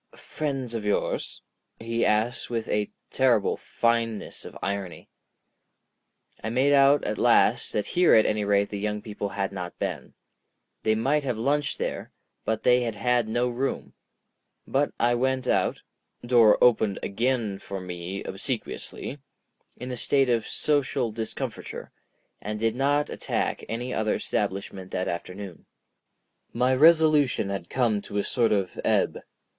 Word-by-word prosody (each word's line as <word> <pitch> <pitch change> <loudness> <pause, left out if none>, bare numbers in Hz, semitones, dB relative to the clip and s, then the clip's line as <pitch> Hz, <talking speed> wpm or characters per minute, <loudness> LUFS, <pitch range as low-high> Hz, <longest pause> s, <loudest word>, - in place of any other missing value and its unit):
"Friends 135 -5 -4
of 115 -2 -3
yours?" 105 0 -2 0.4
he 115 +1 -1
asked 110 +3 +1
with 115 -2 -2
a 105 -1 0 0.2
terrible 120 -6 +3
fineness 115 -2 -1
of - - -9
irony. 100 -3 -4 1.3
I 110 - -2
made 130 +5 +3
out 140 +1 +5
at 105 - -2
last - - +3
that 105 - 0
here 180 0 +4
at 110 - +6
any 105 0 +1
rate 100 0 +2
the 100 - -3
young 105 0 -2
people 105 -2 -4
had 100 0 -2
not 90 -3 -6
been. - - -4 0.7
They 110 0 +2
might 140 +7 +1
have 125 -5 -2
lunched 145 +5 0
there, - - -4 0.3
but 110 -1 -1
they 125 0 +5
had 115 -3 -2
had 120 +2 +1
no 120 +3 +1
room. 125 +3 -3 0.7
But 140 +2 +1
I 120 +1 +3
went 130 +1 0
out—door 120 -3 +2
opened 110 -4 +4
again 115 -2 -1
for 100 0 -6
me 90 +1 -6
obsequiously—in 130 -2 -7
a 125 - -4
state 135 +1 +2
of 115 -2 +1
social 140 -5 0
discomfiture, 110 +1 -6 0.5
and 105 0 -4
did 115 0 +1
not 145 +3 +1
attack - - -2
any 120 +3 -3
other 110 0 0
establishment 95 -2 -3
that 90 0 -2
afternoon. 90 +1 -6 0.9
My 125 +2 +2
resolution 155 -6 +4
had 95 -3 -5
come 115 -5 +1
to 105 - -6
a 100 - +1
sort 115 -3 +1
of 100 -4 0
ebb. - - +1
115 Hz, 140 wpm, -26 LUFS, 105-130 Hz, 1.3 s, at